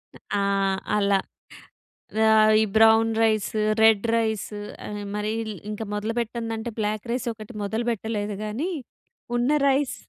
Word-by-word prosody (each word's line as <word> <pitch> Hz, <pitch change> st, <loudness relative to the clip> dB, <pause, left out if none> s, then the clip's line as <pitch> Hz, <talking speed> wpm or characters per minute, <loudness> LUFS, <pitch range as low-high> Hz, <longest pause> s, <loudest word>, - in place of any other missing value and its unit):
అ -, -, -14 dB, 0.2 s
ఆ! -, -, +1 dB, 0.5 s
అలా. 200 Hz, -1 st, +3 dB, 1.1 s
ఆహ్, 215 Hz, 0 st, +6 dB
ఈ -, -, +4 dB
బ్రౌన్ 225 Hz, 0 st, +6 dB
రైస్, 215 Hz, -2 st, +2 dB, 0.3 s
రెడ్ 220 Hz, -1 st, +5 dB
రైస్ 220 Hz, -2 st, 0 dB, 0.4 s
ఆహ్, 205 Hz, 0 st, -5 dB
మరీ 215 Hz, +1 st, -2 dB, 0.2 s
ఇంక 215 Hz, +1 st, -5 dB
మొదలు 210 Hz, +2 st, -2 dB
పెట్టందంటే 230 Hz, 0 st, -3 dB
బ్లాక్ 215 Hz, +2 st, -2 dB
రైస్ 245 Hz, 0 st, -2 dB
ఒకటి 215 Hz, +2 st, -11 dB
మొదలు 220 Hz, +4 st, -2 dB
పెట్టలేదు 210 Hz, -2 st, -3 dB
గానీ 270 Hz, -, -3 dB, 0.7 s
ఉన్న 240 Hz, +3 st, +1 dB, 0.2 s
రైస్ 275 Hz, 0 st, +1 dB
220 Hz, 130 wpm, -25 LUFS, 210-230 Hz, 1.1 s, ఆహ్